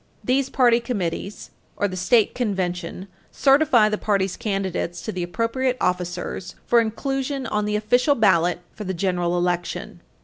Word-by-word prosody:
These 265 +1 +1
party 240 -3 +4
committees 200 -4 -4 0.3
or 205 - +1
the 185 - -6
state 210 +4 +3
convention 185 -5 -3 0.2
certify 270 -5 +4
the 210 0 -1
party's 195 -3 0
candidates 195 -6 -2
to 220 - -3
the 185 - -4
appropriate 230 +8 -1
officers 180 0 -2
for 240 - +4
inclusion 270 +4 -2
on 210 -2 -1
the 210 0 -1
official 245 +7 +2
ballot 180 -6 +3
for 210 - -7
the 190 -1 -3
general 175 -1 0
election. 175 0 -2
210 Hz, 145 wpm, -23 LUFS, 180-240 Hz, 0.3 s, party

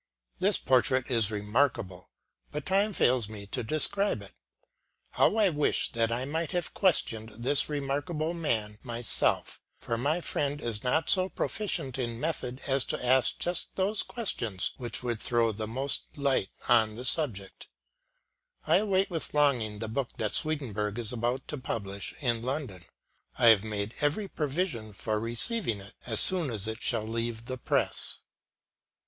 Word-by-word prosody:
This - - +3
portrait 130 0 +2
is 115 -4 +3
remarkable, 105 -3 -1 0.4
but 150 -1 -5
time 200 +3 +2
fails 125 - +2
me 105 -2 -8
to 100 - -4
describe 155 - 0
it. 100 - -13 0.8
How - - +3
I 210 -3 +4
wish 150 -3 +1
that 115 -2 0
I 120 +2 -1
might 160 +3 -2
have 175 -2 -2
questioned 115 - +1
this 130 +5 +3
remarkable 150 +3 -2
man 110 -11 -2
myself, 120 -2 +1 0.2
for 115 -1 -3
my 150 +7 0
friend 145 -4 -2
is 115 -6 -3
not 145 +5 +1
so 185 0 +4
proficient 160 - -2
in 120 -2 -3
method 130 -4 -3
as 135 -2 +2
to - - -4
ask 130 +1 +3
just 175 +1 -2
those 195 +2 +1
questions 115 - 0
which 120 0 -2
would 120 -3 -2
throw 115 -2 +2
the 110 +1 -5
most 135 +6 -1
light 140 -8 +1 0.2
on 110 -3 +4
the 125 +3 -7
subject. 120 - 0 1.0
I - - +4
await 195 -2 +1
with 165 -3 -2
longing 125 -8 +2
the 110 +1 -5
book 120 +3 -4
that 105 -2 -1
Swedenborg 115 -9 -1
is 120 -1 -1
about 120 +2 -2
to 150 - -4
publish 100 -5 -4
in 120 -4 +1
London. 130 - -4 0.6
I 120 - +6
have 105 -3 +6
made 105 0 -3
every 150 +8 0
provision 145 - -3
for 105 +2 -2
receiving 115 - +1
it 100 +1 -11
as 110 -3 +5
soon 180 -6 +6
as 110 -4 -1
it 110 +1 -5
shall 110 - +1
leave 115 0 -4
the 130 0 -5
press. - - 0
125 Hz, 160 wpm, -29 LUFS, 110-150 Hz, 1.0 s, I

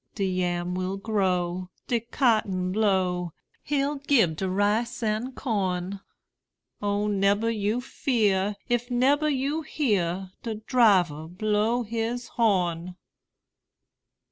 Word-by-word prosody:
De 200 - 0
yam 180 -1 -1
will 185 +1 -2
grow, 185 -3 -1 0.2
de 240 - +1
cotton 215 -6 +1
blow, 185 -4 +1 0.3
He'll 285 0 0
gib 265 - +3
de 190 +2 -1
rice 210 +5 0
an' 220 +4 -1
corn: 195 -6 -2 0.8
O 205 0 0
nebber 205 +2 +2
you 215 +2 -1
fear, 210 -6 0
if 240 +1 0
nebber 275 +5 +3
you 285 +3 0
hear 195 - -1
De 225 -2 -4
driver 195 - +3
blow 215 +6 0
his 230 +2 -3
horn! 180 -6 0
210 Hz, 110 wpm, -26 LUFS, 185-240 Hz, 0.8 s, gib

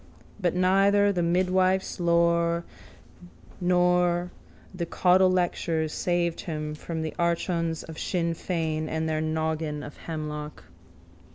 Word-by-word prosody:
But 180 -3 0
neither 195 +2 +4
the 180 -3 -1
midwife's 185 +2 +1
lore 170 0 +2 1.0
nor 180 0 +2 0.4
the 175 -2 -4
caudlelectures 180 -4 +2
saved 175 -1 0
him 155 -2 -4
from 160 +1 -5
the 160 - -4
archons 170 -1 0
of 160 -1 -9
Sinn 170 -3 -1
Fein 160 -2 -2
and 160 0 -1
their 155 0 0
naggin 155 -1 -2
of 150 - -10
hemlock. 150 -2 -6
170 Hz, 110 wpm, -26 LUFS, 160-180 Hz, 1.0 s, neither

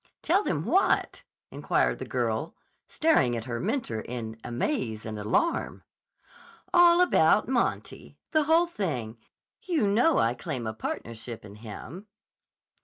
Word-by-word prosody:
"Tell 370 +5 +3
them - - -2
what?" 385 - +1 0.3
inquired - - 0
the - - -5
girl, - - -2 0.3
staring 130 - +2
at 115 - -6
her 120 -2 -4
mentor 215 - -2
in 115 -2 -6
amaze 120 - -2
and 110 -1 -5
alarm. 110 - -1 0.9
"All 350 0 +6
about 360 - +4
Monty. - - -2
The 310 -2 +2
whole 325 +3 +4
thing. 130 - -4 0.4
You 330 - 0
know, 240 +10 +3
I 115 - +2
claim 130 -1 -5
a 110 - -3
partnership 115 +1 -6
in 100 0 -12
him." 130 - -9
130 Hz, 130 wpm, -27 LUFS, -, 0.9 s, All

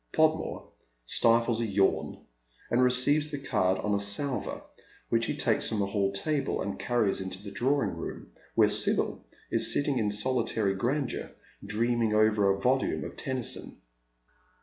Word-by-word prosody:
Podmore 160 0 +1 0.4
stifles 115 - +2
a - - 0
yawn 100 -1 0 0.5
and 120 - +3
receives 130 +4 +3
the 145 - -4
card 105 -9 0
on 105 - -1
a 100 - +1
salver, 110 +7 -2 0.5
which 115 0 +1
he 150 - -2
takes 115 -6 +1
from 110 - -2
the 100 - +1
hall 100 0 0
table, 140 +8 -1
and 100 - -4
cariies 115 -6 +1
into 95 0 -5
the 100 - -8
drawing 135 +8 0
room, - - -6 0.3
where - - +5
Sibyl - - +1 0.3
is - - +4
sitting 140 -2 +1
in 105 -2 0
solitary 110 -2 0
grandeur 125 +7 -2 0.3
dreaming 115 0 0
over 105 -2 +3
a 100 0 +1
volume 130 +5 +1
of - - -7
Tennyson. 130 -3 -4
115 Hz, 150 wpm, -28 LUFS, 100-130 Hz, 0.5 s, where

